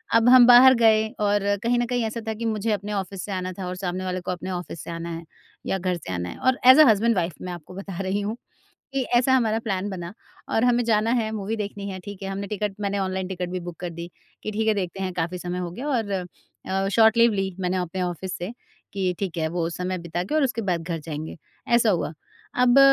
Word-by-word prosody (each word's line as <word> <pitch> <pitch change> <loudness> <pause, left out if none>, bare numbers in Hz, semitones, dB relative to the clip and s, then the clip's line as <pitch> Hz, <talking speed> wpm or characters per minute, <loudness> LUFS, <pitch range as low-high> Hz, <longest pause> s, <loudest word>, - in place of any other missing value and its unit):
अब 230 +1 +5
हम 250 -1 +9
बाहर 250 +2 +9
गए 220 -1 +5
और 205 -1 +2 0.2
कहीं 240 +1 +2
न 240 - +1
कहीं 245 -1 -1
ऐसा 220 +1 -3
था 220 - 0
कि 230 +2 -5
मुझे 220 0 0
अपने 210 0 -2
ऑफिस 195 -1 -3
से 205 - -7
आना 185 -1 -2
था 190 0 -6
और 180 - -4
सामने 185 0 -3
वाले 185 0 -2
को 180 - -2
अपने 180 +1 -5
ऑफिस 175 -3 -5
से - - -9
आना 170 0 -5
है 165 - -7 0.4
या 195 - 0
घर 185 -1 -1
से 120 - -6
आना 90 0 -3
है। - - -8
और 260 0 +2
एज़ 260 +3 +10
अ - - +9
हस्बैंड 225 +2 +3
वाइफ 175 -2 0
मैं 180 - -5
आपको 175 0 -10
बता 195 -2 -7
रही 195 +2 -1
हूँ 210 +3 -2 0.6
कि 270 -1 0
ऐसा 255 +2 +4
हमारा 225 -4 +2
प्लान 195 -1 -1
बना 175 -2 -6 0.4
और 225 - +2
हमें 245 0 +3
जाना 225 0 +2
है 220 -1 -2
मूवी 215 +1 -3
देखनी 200 -1 -5
है। 190 - -5
ठीक 205 -1 -8
है? 195 - -3
हमने 195 +1 -4
टिकट 210 0 -3
मैंने 200 0 -1
ऑनलाइन 190 -1 -2
टिकट 180 -1 -4
भी 185 0 -3
बुक 175 -1 -7
कर 175 - -4
दी 170 +1 -8 0.3
कि 215 - -3
ठीक 220 +1 -1
है, 220 - +4
देखते 190 -1 -3
हैं 185 - -2
काफ़ी 180 +1 -2
समय 180 0 -4
हो 175 -1 -3
गया 250 +12 -5
और 230 -7 0 0.6
अ, 195 +1 0
शॉर्ट 220 +2 +5
लीव 235 -1 +5
ली 195 -2 -2
मैंने 185 0 0
अपने 180 0 -2
ऑफिस 180 +1 -3
से 180 +6 -5 0.4
कि 185 -2 -1
ठीक 190 -4 -3
है 160 - 0
वो 165 0 -1
समय 180 +2 -3
बिता 170 +1 -3
के 200 - -4
और 310 - +3
उसके 235 -3 -1
बाद 180 -4 -1
घर 165 0 -3
जाएँगे, 155 +1 -6 0.3
ऐसा 235 -2 +4
हुआ। 170 -5 0 0.4
अब 250 +1 +5
195 Hz, 255 wpm, -24 LUFS, 180-220 Hz, 0.6 s, एज़